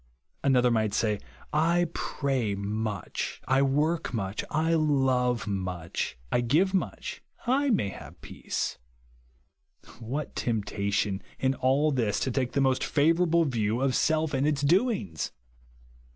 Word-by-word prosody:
Another 125 -3 +4
might 110 -2 +1
say, 105 -3 +1 0.3
I 170 +3 +3
pray 130 -8 -1
much, 105 -1 -3
I 130 +1 +3
work 150 +5 +1
much, 100 -1 -2
I 160 +2 +1
love 130 -6 +2
much, 90 - -3
I 120 - +2
give 160 +11 +2
much, 190 - -2 0.2
I 275 +3 +2
may 195 - +2
have - - -11
peace. - - -4 1.2
What 130 +6 -4
temp 110 -4 -1
tation 100 -1 -1 0.2
in 130 0 +1
all 135 +4 +2
this 115 -7 0
to 130 - 0
take 125 0 -1
the 140 - +2
most 130 -1 +2
flivour 165 +4 +3
able 165 0 +3
view 115 -4 0
of 135 0 +1
self 160 +2 +1
and 135 +2 +2
its 145 -2 0
doings 170 - +1
130 Hz, 135 wpm, -28 LUFS, 110-155 Hz, 1.2 s, Another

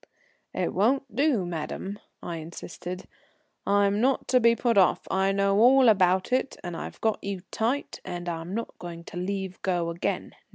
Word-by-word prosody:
"It - - -1
won't 250 +3 +1
do, 270 - +2
madame," 175 +4 -5 0.2
I 170 -1 -4
insisted. 175 +2 -7 0.6
"I'm 200 +1 +3
not 265 +2 +1
to 255 - +5
be 235 0 +5
put 235 -1 +1
off. 190 -3 +4
I 190 +1 +2
know 200 0 +2
all 255 +2 +7
about 190 +1 +3
it, 260 +1 0
and 175 -1 -5
I've - - -7
got 220 -1 0
you 195 -2 -3
tight, 245 +6 -1
and 175 -1 -6
I'm 170 +2 -4
not 230 - -4
going 170 -1 -7
to 170 - -9
leave 190 0 -3
go 175 -3 0
again. 170 - -3
195 Hz, 170 wpm, -27 LUFS, 175-230 Hz, 0.6 s, all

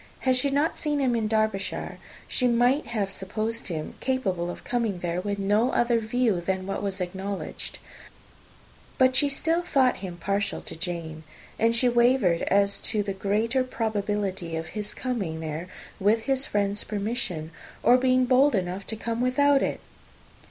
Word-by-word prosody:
Had 260 -1 +3
she 255 +3 +1
not 290 +4 +1
seen 300 -1 0
him 255 -3 +2
in 225 -2 0
Derbyshire, 215 -3 -1 0.3
she 250 - +1
might 245 +5 +3
have 205 -4 -2
supposed 215 +4 -2
him 160 -4 -4
capable 195 -10 -1
of - - -7
coming 235 -6 -1
there 175 0 -2
with 200 +1 -2
no 205 +5 +2
other 235 -1 +3
view 225 -4 +1
than 185 +1 -2
what 195 - -3
was 195 -1 -3
acknowledged; 190 +2 -4 1.2
but 260 0 +4
she 285 +1 +3
still 325 +4 0
thought 265 -7 +2
him 180 -3 -7
partial 200 +3 -1
to - - -5
Jane, 165 -2 -5 0.4
and 230 +1 +3
she 250 +2 +3
wavered 240 -7 +3
as 200 0 +2
to 215 -2 0
the 200 -1 -3
greater 215 +6 +1
probability 205 -7 -2
of 160 0 -4
his 210 -1 -4
coming 200 -11 -3
there 160 +2 -4 0.3
with 210 +3 +3
his 270 +2 +1
friend's 205 0 0
permission, 200 -7 -3 0.3
or 245 - +7
being 255 0 +3
bold 260 +2 +4
enough 185 +1 -2
to 220 - -2
come 230 +2 -3
without 275 +2 +4
it. - - -1
215 Hz, 165 wpm, -26 LUFS, 190-250 Hz, 1.2 s, or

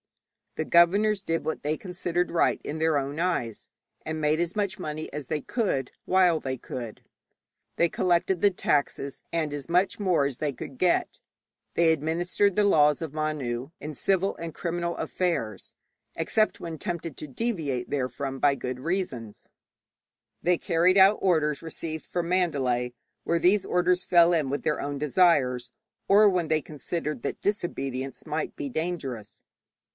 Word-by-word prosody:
The 155 - -2
governors 195 +5 +4
did 165 -2 -1
what 160 - -2
they 150 +2 0
considered 180 -1 -2
right 170 - +2
in 155 +2 -4
their 160 -1 +2
own 140 +2 -3
eyes, 165 - -2 0.4
and 160 0 -3
made 155 +1 +2
as 175 0 -1
much 205 -1 -1
money 155 -3 -5
as 145 -3 -5
they 155 - -1
could, 145 - -1
while 180 -3 +3
they 130 -1 -3
could. 120 -2 -7 0.7
They 170 - +4
collected 175 +1 +1
the 205 - +6
taxes 140 -5 -1
and 160 -3 -1
as 145 +2 -6
much 180 +3 +2
more 180 -8 +2
as 140 -3 -3
they 150 -2 0
could 130 0 -9
get; 180 +3 +1 0.6
they 170 -1 +4
administered 175 +5 0
the 210 - +3
laws 150 -6 +4
of 160 -3 -5
Manu 140 -5 -2
in 150 +1 -6
civil 195 +5 +1
and 165 -1 -6
criminal 170 0 -2
affairs, 115 - -2 0.4
except 215 +7 +1
when 165 -1 -6
tempted 170 -5 -4
to 150 - -7
deviate 145 - -2
therefrom 135 0 -3
by 140 0 +4
good 125 -2 -5
reasons; 130 - -4 0.9
they 175 0 +3
carried 175 +3 +3
out 195 +2 +6
orders 155 -6 +2
received 160 -1 -5
from 175 -1 -2
Mandalay, 135 -9 0 0.3
when 170 0 0
these 185 +4 +4
orders 180 0 +2
fell 175 0 +5
in 155 -5 +1
with 145 - -2
their 150 - 0
own 145 0 -3
desires, 135 -5 +2 0.4
or 210 +2 +7
when 180 -5 +1
they 155 -1 +2
considered 150 -2 -4
that - - -4
disobedience 135 -10 -3
might 155 0 -3
be 145 - -3
dangerous. 140 - -4
160 Hz, 160 wpm, -27 LUFS, 140-180 Hz, 0.9 s, or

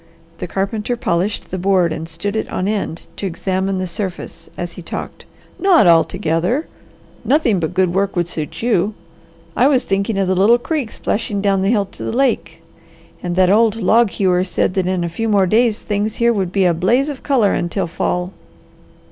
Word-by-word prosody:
The - - -4
carpenter 210 +6 -2
polished 200 -3 -2
the 185 - -3
board 180 -3 +2
and 160 +1 -6
stood 200 +6 -3
it 220 - -2
on 185 - -1
end 200 -5 -3
to 200 - -3
examine 190 +2 -2
the 185 - -2
surface 185 0 -6
as 175 -1 -4
he 180 - -10
talked. - - -7 0.3
"Not 370 - +5
altogether! 175 - +2 0.6
Nothing 255 - +2
but 165 +1 -3
good 185 -2 +2
work 195 +1 0
would 175 -1 0
suit 155 +4 -5
you. 215 -3 +1 0.6
I 255 - +4
was 270 -3 +3
thinking 195 +2 -1
of 195 -1 +1
the 190 - +2
little 200 +6 +5
creek 260 -2 -3
splashing 205 -1 -2
down 195 -1 +1
the 195 - +1
hill 210 -3 +2
to 195 - -11
the - - -2
lake; 260 +2 -1 0.6
and 175 -1 -3
that 185 0 +4
old 220 +1 +4
log 225 +1 +3
hewer 185 -2 +1
said 185 0 0
that 185 -1 0
in 185 -1 0
a - - -1
few 225 +7 -3
more 200 -2 +4
days 220 +3 +2
things 210 +1 -1
here 235 0 +2
would 190 -5 -1
be 195 -1 +2
a 175 - +4
blaze 225 - +2
of 285 -3 -5
colour 245 -8 +2
until 175 +3 -1
fall." 180 +2 -2
195 Hz, 195 wpm, -18 LUFS, 180-225 Hz, 0.6 s, Not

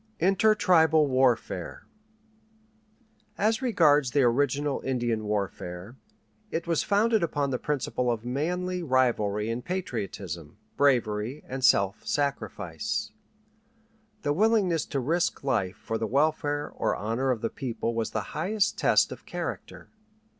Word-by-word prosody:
INTERTRIBAL 185 -5 +4
WARFARE 130 -3 0 1.5
As 220 +4 +1
regards 155 - +3
the 140 +2 +2
original 140 +3 +1
Indian 120 -4 -1
warfare, 100 0 -4 0.5
it 165 - -3
was 170 -2 +1
founded 215 +2 +2
upon 145 -4 -1
the 125 - -1
principle 130 -3 -1
of 115 -1 -2
manly 180 +8 -2
rivalry 120 -8 +1
in 120 +2 -3
patriotism, 100 - -5 0.2
bravery, 120 -2 +1
and 130 0 -5
self 100 -5 +3
sacrifice. 140 -1 -2 1.1
The 145 -1 +1
willingness 195 -3 +2
to 140 - -2
risk 165 +6 0
life 110 -8 0
for 115 0 -4
the 110 - -1
welfare 145 +2 0
or - - -1
honor 115 +7 -1
of 120 -4 0
the 115 - -2
people 115 -2 -3
was 115 -1 -1
the 110 -2 -5
highest 210 +1 0
test - - +3
of - - -10
character. - - -6
135 Hz, 125 wpm, -27 LUFS, 115-165 Hz, 1.5 s, INTERTRIBAL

